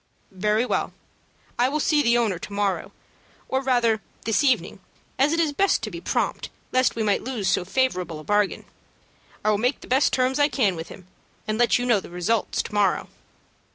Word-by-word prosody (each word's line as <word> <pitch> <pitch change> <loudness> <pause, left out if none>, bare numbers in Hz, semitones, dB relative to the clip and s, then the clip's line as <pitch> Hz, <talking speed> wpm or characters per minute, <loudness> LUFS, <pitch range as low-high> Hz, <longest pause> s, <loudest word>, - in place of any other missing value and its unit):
"Very 210 +4 +1
well. - - -1 0.7
I 250 +2 +4
will 300 +2 -1
see 300 0 +3
the 235 -3 +3
owner 215 -7 0
to 200 - -8
morrow, 200 -1 -1 0.6
or 265 0 0
rather 240 -5 +2 0.2
this 225 +6 +2
evening, 265 -3 +1 0.4
as 280 +3 +4
it 330 - +1
is 315 -3 +1
best 390 -5 +2
to 215 - -4
be 170 -1 -7
prompt, - - -2 0.2
lest 255 0 +2
we 225 - -1
might 205 -2 +1
lose 235 -6 -3
so - - +2
favorable 185 -7 -1
a - - -10
bargain. 205 +2 0 0.8
I 215 - +4
will 205 - +1
make 250 +5 0
the - - -12
best 265 +3 +3
terms 260 +2 +1
I 290 - +5
can 215 -11 +1
with 165 0 -7
him, 185 - -12 0.4
and 215 +1 -1
let 240 - +4
you 245 - -2
know 235 -4 +3
the - - -11
result 180 +6 -1
to - - -2
morrow." 205 -2 +1
230 Hz, 200 wpm, -24 LUFS, 200-260 Hz, 0.8 s, I